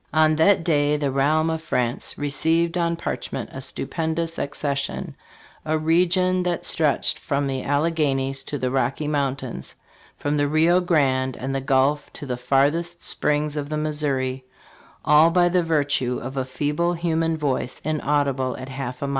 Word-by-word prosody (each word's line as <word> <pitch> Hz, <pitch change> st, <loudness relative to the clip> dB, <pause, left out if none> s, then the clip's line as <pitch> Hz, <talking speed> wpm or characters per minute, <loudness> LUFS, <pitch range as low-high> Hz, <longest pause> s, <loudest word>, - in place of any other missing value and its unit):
"On 155 Hz, 0 st, +4 dB
that 170 Hz, +2 st, +4 dB
day 150 Hz, -2 st, +2 dB
the 145 Hz, -2 st, -1 dB
realm 155 Hz, +4 st, +2 dB
of 160 Hz, 0 st, -3 dB
France 125 Hz, -6 st, -2 dB
received 160 Hz, +4 st, +1 dB
on 170 Hz, -1 st, +1 dB
parchment 170 Hz, -, -4 dB
a 135 Hz, -, -6 dB
stupendous 160 Hz, +4 st, -3 dB
accession 140 Hz, 0 st, -3 dB, 0.3 s
" -, -, -26 dB
a 155 Hz, 0 st, 0 dB
region 180 Hz, +3 st, +2 dB
that 175 Hz, -1 st, -2 dB
stretched 150 Hz, -4 st, +1 dB
from 140 Hz, 0 st, -1 dB
the 135 Hz, -1 st, -2 dB
Alleghenies 145 Hz, -3 st, 0 dB
to 145 Hz, -, -4 dB
the 130 Hz, -2 st, -2 dB
Rocky 135 Hz, +3 st, 0 dB
Mountains, 135 Hz, -4 st, -3 dB, 0.4 s
from 145 Hz, +1 st, -1 dB
the 145 Hz, 0 st, +2 dB
Rio 160 Hz, +4 st, +4 dB
Grande 135 Hz, -7 st, +1 dB
and 135 Hz, +1 st, -3 dB
fhe 135 Hz, -, -2 dB
Gulf 135 Hz, +2 st, +2 dB
to 145 Hz, -, -8 dB
the 125 Hz, -2 st, -2 dB
farthest 145 Hz, +7 st, 0 dB
springs 150 Hz, 0 st, -1 dB
of 145 Hz, -1 st, -3 dB
the 155 Hz, -, -2 dB
Missouri, 140 Hz, -4 st, -2 dB, 0.6 s
"all 150 Hz, +2 st, +6 dB
by 175 Hz, +1 st, +3 dB
the 180 Hz, 0 st, +2 dB
virtue 145 Hz, -6 st, 0 dB
of 130 Hz, +2 st, -6 dB
a 130 Hz, -1 st, -1 dB
feeble 150 Hz, +6 st, -1 dB
human 165 Hz, -1 st, 0 dB
voice, 135 Hz, -4 st, -2 dB
inaudible 145 Hz, -4 st, 0 dB
at 130 Hz, -, -8 dB
half 130 Hz, -1 st, -5 dB
a -, -, 0 dB
mile." -, -, -3 dB
145 Hz, 165 wpm, -23 LUFS, 135-160 Hz, 0.6 s, all